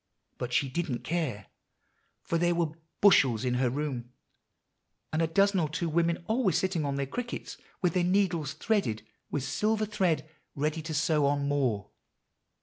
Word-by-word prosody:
But 125 0 -3
she 140 +2 +2
didn't 135 -2 -3
care; 150 - -2 0.8
for 165 - 0
there 175 0 +2
were 170 -3 0 0.3
bushels 130 - +5
in 125 - +1
her 125 - +3
room, 130 -3 -3 1.0
and 155 - +1
a 165 - +3
dozen 195 +4 +3
or 155 -3 0
two 170 +3 -2
women 170 +1 +1
always 220 - +2
sitting 185 -4 0
on 140 -1 -1
their 140 0 -1
crickets, 240 - -5 0.3
with 175 -3 +3
their 180 - +2
needles 175 -5 +1
threaded 200 - 0 0.2
with 145 - -2
silver 215 +9 0
thread, 190 -7 0 0.3
ready 150 +3 -1
to 160 0 -4
sew 150 -1 +2
on 140 0 +1
more. 125 -8 0
160 Hz, 160 wpm, -29 LUFS, 140-180 Hz, 1.0 s, bushels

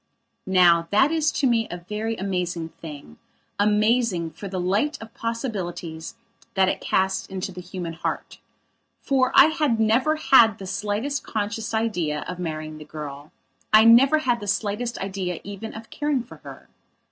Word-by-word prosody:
Now 175 -3 +5
that 270 +9 +4
is 310 -2 +1
to 280 - 0
me 230 -2 +2
a 175 - -5
very 220 +2 -2
amazing 180 -4 -3
thingamazing 205 - -1
for 200 - -7
the 185 -1 -4
light 200 +12 0
of 225 0 -11
possibilities 190 -9 -5 0.4
that 190 -1 +4
it - - -1
casts 190 0 0
into 190 0 -5
the 180 0 -8
human 180 -2 -6
heart. 165 - -5 0.6
For 260 -2 +2
I - - +8
had 300 -7 0
never 235 +8 +3
had 235 -8 +5
the 195 - -8
slightest 210 +9 -2
conscious 215 +1 -3
idea 180 -10 -1
of 180 0 -6
marrying 155 -2 -5
the - - -9
girl; 150 -1 -8 0.4
I 215 0 +8
never 255 +6 +7
had 245 -6 0
the 205 - -7
slightest 210 +4 -1
idea 190 -3 -4
even 205 +2 -7
of 220 0 -10
caring 290 -4 -1
for - - -13
her. - - -12
205 Hz, 160 wpm, -24 LUFS, 180-230 Hz, 0.6 s, I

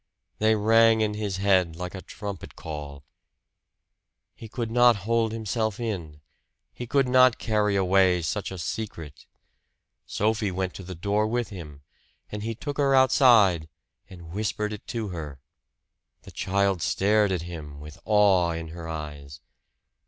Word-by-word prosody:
They 110 +1 +3
rang 115 +1 +4
in 105 -1 0
his 105 -3 -3
head 95 -4 +2
like 90 +1 -6
a 95 - -7
trumpet 100 -3 -8
call. 75 -3 -8 1.3
He 110 - -11
could 115 0 -4
not 120 0 +5
hold 115 -1 +1
himself 110 -1 -2
in. 85 -10 -5 0.5
He 120 - -7
could 135 +1 +2
not 130 -1 +5
carry 105 -2 0
away 95 -2 +3
such 100 +5 -2
a 95 - -7
secret. 85 -4 -6 0.8
Sophie 105 0 0
went 95 0 -3
to 95 - -9
the 95 0 -8
door 100 +5 0
with 120 +1 -2
him; 75 -8 -10 0.5
and 105 - -5
he 115 +1 -4
took 145 +3 -6
her 140 -1 +3
outside 115 - +5 0.4
and 85 -3 -12
whispered 105 +2 -2
it 105 - -10
to 115 -3 -4
her. 75 -6 -7 0.8
The - - -12
child 100 -1 0
stared 105 +2 +2
at 90 -3 -2
him, 80 -4 -8
with 75 +1 -11
awe 100 -5 +3
in 80 -1 -6
her 85 0 -8
eyes. 75 -3 -7
100 Hz, 150 wpm, -26 LUFS, 85-110 Hz, 1.3 s, not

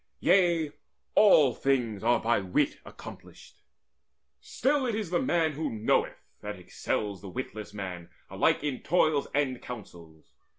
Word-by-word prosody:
Yea, 170 -5 +3 0.4
all 155 - +6
things 120 -7 -1
are 120 +1 +3
by 115 0 +1
wit 95 -2 0
accomplished. - - -13 0.8
Still 270 - 0
It 230 - -1
is 210 -6 -4
the 180 - +1
man 170 -10 +1
who 155 +2 -3
knoweth 110 -1 0 0.2
that 105 -1 -6
excels 100 +2 -3
The 100 - -8
witless 110 -2 -6
man 95 -4 -7 0.2
alike - - +1
in 145 -4 -3
toils 155 -4 +2
and 135 -4 0
counsels. 85 -9 -11
125 Hz, 135 wpm, -28 LUFS, 105-160 Hz, 0.8 s, all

